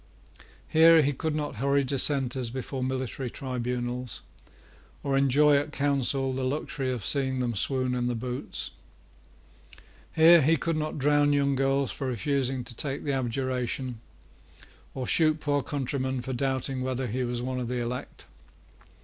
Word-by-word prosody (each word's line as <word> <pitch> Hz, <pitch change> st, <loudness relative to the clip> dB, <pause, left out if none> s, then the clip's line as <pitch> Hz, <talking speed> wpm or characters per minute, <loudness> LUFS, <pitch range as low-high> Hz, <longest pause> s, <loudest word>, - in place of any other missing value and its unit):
Here 160 Hz, 0 st, +6 dB
he 145 Hz, +1 st, +1 dB
could 155 Hz, +3 st, -2 dB
not 145 Hz, -5 st, -3 dB
hurry 140 Hz, +3 st, +2 dB
Dissenters 130 Hz, -2 st, +1 dB
before 130 Hz, +1 st, -4 dB
military 130 Hz, 0 st, -3 dB
tribunals, 125 Hz, -1 st, -4 dB, 0.8 s
or 140 Hz, -1 st, 0 dB
enjoy 140 Hz, +2 st, +4 dB
at 145 Hz, +1 st, -2 dB
Council 135 Hz, -2 st, 0 dB
the 130 Hz, 0 st, -2 dB
luxury 135 Hz, 0 st, -2 dB
of 120 Hz, -6 st, -4 dB
seeing 130 Hz, 0 st, +1 dB
them 120 Hz, -2 st, -1 dB
swoon 130 Hz, +4 st, 0 dB
in 125 Hz, -1 st, -1 dB
the 125 Hz, -, -1 dB
boots. 125 Hz, +2 st, -5 dB, 1.4 s
Here 165 Hz, +1 st, +8 dB
he 160 Hz, +4 st, +3 dB
could 165 Hz, +2 st, -1 dB
not 155 Hz, 0 st, -3 dB
drown 145 Hz, +1 st, +3 dB
young 140 Hz, -1 st, +2 dB
girls 135 Hz, 0 st, +1 dB
for 135 Hz, -, -4 dB
refusing 130 Hz, +1 st, -1 dB
to 120 Hz, 0 st, -7 dB
take 140 Hz, +3 st, -3 dB
the 145 Hz, -, -1 dB
abjuration, 130 Hz, -1 st, -2 dB, 0.9 s
or 130 Hz, -, -3 dB
shoot 155 Hz, +3 st, +3 dB
poor 145 Hz, -1 st, 0 dB
countrymen 130 Hz, -2 st, -2 dB
for 130 Hz, -, -4 dB
doubting 130 Hz, 0 st, -1 dB
whether 130 Hz, 0 st, -2 dB
he 125 Hz, +2 st, -2 dB
was 120 Hz, 0 st, -2 dB
one 130 Hz, 0 st, -2 dB
of 125 Hz, -, -3 dB
the 125 Hz, +1 st, -2 dB
elect. 120 Hz, +1 st, -5 dB
130 Hz, 150 wpm, -27 LUFS, 125-140 Hz, 1.4 s, Here